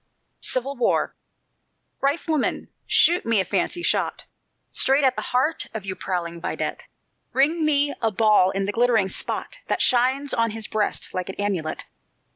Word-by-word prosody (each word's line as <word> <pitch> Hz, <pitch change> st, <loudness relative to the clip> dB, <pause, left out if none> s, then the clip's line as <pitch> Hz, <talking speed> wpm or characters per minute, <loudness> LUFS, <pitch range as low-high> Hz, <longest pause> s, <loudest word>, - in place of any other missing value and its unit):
CIVIL 265 Hz, +2 st, -2 dB
WAR 240 Hz, -, +1 dB, 0.9 s
"Rifleman, 300 Hz, +1 st, 0 dB, 0.2 s
shoot 350 Hz, +1 st, +4 dB
me 230 Hz, -2 st, +2 dB
a 190 Hz, -, +1 dB
fancy 205 Hz, -, -1 dB
shot -, -, 0 dB, 0.5 s
Straight 270 Hz, +2 st, +3 dB
at 260 Hz, -1 st, +3 dB
the -, -, -3 dB
heart 260 Hz, +6 st, 0 dB
of 210 Hz, -3 st, -5 dB
yon 190 Hz, -1 st, -3 dB
prowling 170 Hz, -2 st, -3 dB
vidette; -, -, -4 dB, 0.5 s
Ring 310 Hz, +5 st, +2 dB
me 290 Hz, -1 st, +2 dB
a 225 Hz, -, +2 dB
ball 210 Hz, -3 st, +4 dB
in 195 Hz, 0 st, -1 dB
the 205 Hz, -, -1 dB
glittering 225 Hz, -3 st, +2 dB
spot -, -, -3 dB
That -, -, 0 dB
shines 260 Hz, +3 st, +3 dB
on 230 Hz, -1 st, +2 dB
his 220 Hz, -, -3 dB
breast 215 Hz, -1 st, -2 dB
like 185 Hz, 0 st, -3 dB
an 190 Hz, -, -5 dB
amulet!" 190 Hz, -6 st, -2 dB
230 Hz, 155 wpm, -24 LUFS, 195-280 Hz, 0.9 s, shoot